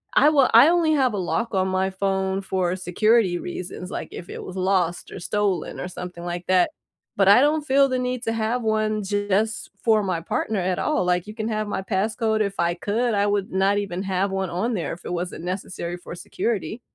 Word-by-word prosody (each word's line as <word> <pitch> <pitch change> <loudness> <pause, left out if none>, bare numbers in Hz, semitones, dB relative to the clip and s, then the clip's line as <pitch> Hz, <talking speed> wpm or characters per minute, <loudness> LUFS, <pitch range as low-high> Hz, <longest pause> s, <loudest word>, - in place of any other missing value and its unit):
I 295 - +6
will 280 -4 +4
I 240 +8 +9
only 335 -3 +3
have 260 -6 +2
a - - -2
lock 220 +5 -2
on 190 0 +2
my 190 +1 0
phone 190 0 -1
for 185 -2 -1
security 190 +1 +2
reasons, 180 +1 -6
like, - - -4
if 175 - -8
it - - -7
was 185 - -8
lost 185 -2 0
or - - -7
stolen 200 0 -1
or 180 - -4
something 180 -1 -7
like 175 0 -5
that. 185 -1 +3 0.5
But 195 -1 +4
I 225 +6 +8
don't 300 +1 +2
feel 275 0 +4
the 255 0 0
need 250 -1 -2
to 225 - -1
have 225 +2 -1
1 215 -1 0
just 205 +2 -1
for 220 -2 +4
my 180 -4 -1
partner 210 +4 -2
at 180 0 -1
all, 305 -9 +1
like, 180 +2 +1
you 210 - -7
can 220 -1 -3
have 215 -1 -2
my 190 - -2
passcode 220 +3 0
if 200 -1 -2
I 170 0 +2
could, 225 +5 -1
I 200 0 +2
would 205 -1 -1
not 195 +2 +2
even 195 -2 -3
have 190 +1 0
1 190 -2 -2
on 220 +8 -1
there 170 -4 -3
if 170 - -11
it - - -4
wasn't 175 -1 -4
necessary 180 -1 -4
for 175 - -9
security. 215 +2 -3
195 Hz, 220 wpm, -23 LUFS, 180-220 Hz, 0.5 s, I